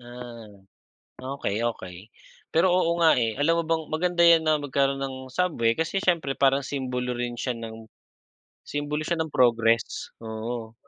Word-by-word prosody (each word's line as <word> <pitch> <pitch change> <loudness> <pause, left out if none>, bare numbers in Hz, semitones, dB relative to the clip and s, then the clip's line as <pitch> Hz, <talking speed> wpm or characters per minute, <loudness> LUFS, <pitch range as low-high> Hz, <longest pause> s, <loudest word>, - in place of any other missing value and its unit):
Na 115 -5 -12 0.6
okey, 105 -2 -2
okey. 95 +1 -11 0.4
Pero 170 +3 +4
oo 170 -2 +2
nga, 160 - +6
eh, 115 -1 0
alam 165 +3 +2
mo - - -6
bang 165 -1 +1
maganda 175 +1 +2
yan 170 -1 +7
na 155 -1 +3
magkaroon 140 -1 0
ng 135 -1 -3
subway 130 -8 +1
kasi 170 +4 -1
siyempre 170 -7 +1
parang 135 0 +2
simbolo 125 -3 -3
rin 120 0 -4
siya 125 0 -2
ng 115 -1 -8 0.8
simbolo 145 +1 -3
siya 170 +2 -1
ng 160 -2 -3
progress, 115 -3 +2
oo. 110 +1 -5
130 Hz, 155 wpm, -26 LUFS, 115-160 Hz, 0.8 s, yan